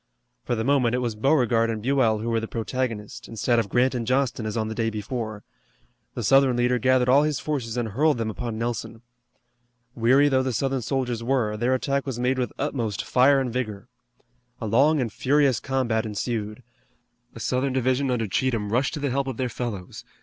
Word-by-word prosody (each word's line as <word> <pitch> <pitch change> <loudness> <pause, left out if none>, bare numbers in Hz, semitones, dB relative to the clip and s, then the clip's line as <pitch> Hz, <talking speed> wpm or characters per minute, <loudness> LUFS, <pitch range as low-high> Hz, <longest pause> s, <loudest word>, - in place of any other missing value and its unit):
For 120 - -1
the 110 - -2
moment 125 -2 +2
it - - +1
was 120 -3 -1
Beauregard 115 -1 +2
and 110 -1 -2
Buell 130 -4 +2
who 110 +2 -3
were 115 - +2
the 110 - -5
protagonists, 115 -2 -4
instead 115 +1 +1
of 105 -3 -2
Grant 130 +2 +2
and 120 -3 -3
Johnston 130 -4 0
as 110 - -3
on 110 -1 -1
the 110 - -4
day 115 0 0
before. 110 0 -5 0.7
The - - -3
Southern 135 -2 +4
leader 125 0 +2
gathered 130 +1 +3
all 135 +3 +6
his 150 -2 0
forces 125 -6 -3
and 120 -2 -1
hurled 145 +7 +2
them 110 -1 -2
upon 115 0 -5
Nelson. 115 0 -4 0.9
Weary 130 +5 +4
though 130 -2 +3
the 130 -1 -2
Southern 135 +2 -1
soldiers 125 -1 -2
were, 120 -4 0
their 120 +4 +1
attack 140 +2 -1
was 130 -3 -3
made 125 +2 0
with 125 - -1
utmost 120 -8 -2
fire 135 +2 +4
and 125 -3 -2
vigor. 115 -3 -4 0.7
A 115 - -4
long 140 +8 +3
and 115 -5 -2
furious 140 -2 +2
combat 125 -5 0
ensued. 110 +1 -4 0.7
A - - -8
Southern 130 +4 -1
division 130 +1 +1
under 120 -3 0
Cheatham 110 0 -1
rushed 130 +5 +1
to - - -4
the 140 -2 -1
help 135 +1 -1
of 130 -4 -4
their 130 -1 -1
fellows. 110 -1 -6
125 Hz, 200 wpm, -25 LUFS, 115-130 Hz, 0.9 s, all